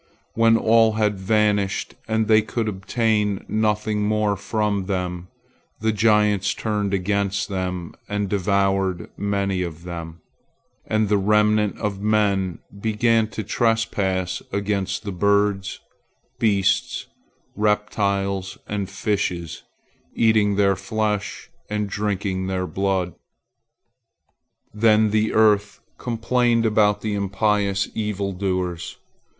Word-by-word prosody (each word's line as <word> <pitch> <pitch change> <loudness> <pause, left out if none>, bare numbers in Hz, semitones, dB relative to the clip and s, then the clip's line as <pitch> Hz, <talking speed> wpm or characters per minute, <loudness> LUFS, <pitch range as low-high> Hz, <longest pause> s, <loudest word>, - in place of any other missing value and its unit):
When 115 0 +4
all 115 0 +4
had 105 -2 0
vanished, 105 -1 +1
and 110 0 0
they 110 0 +5
could 110 +1 -3
obtain 105 0 0
nothing 105 0 0
more 105 -1 +1
from 100 -1 -1
them, 90 -2 -3 0.5
the 110 +1 +1
giants 105 -2 +2
turned 105 -2 -1
against 100 0 -1
men 90 -2 -3 0.2
and 105 0 -1
devoured 95 -2 0
many 100 -2 -1
of 85 -2 -5
them, 85 -2 -7 0.7
and 110 0 +1
the 105 0 +2
remnant 105 +1 +2
of 100 -2 -3
men 100 -4 +1 0.2
began 110 +1 +2
to 110 0 -5
trespass 100 -5 0
against 100 -1 -2
the 100 - -4
birds, 100 +1 +1 0.6
beasts, 100 -3 +1 0.5
reptiles, 100 -2 0
and 100 -2 -3
fishes, 95 -4 -2 0.5
eating 110 -3 +3
their 100 -1 +3
flesh 105 +1 -3 0.2
and 105 0 -1
drinking 100 -2 -2
their 95 -1 -1
blood. 95 -2 -1 1.6
Then 110 0 +4
the 110 0 +1
earth 105 -2 +3 0.2
complained 120 0 +1
about 105 -1 +3
the 110 -1 -2
impious 100 0 0
evil 100 -2 -2
doers. 90 -2 -3
105 Hz, 110 wpm, -22 LUFS, 95-110 Hz, 1.6 s, they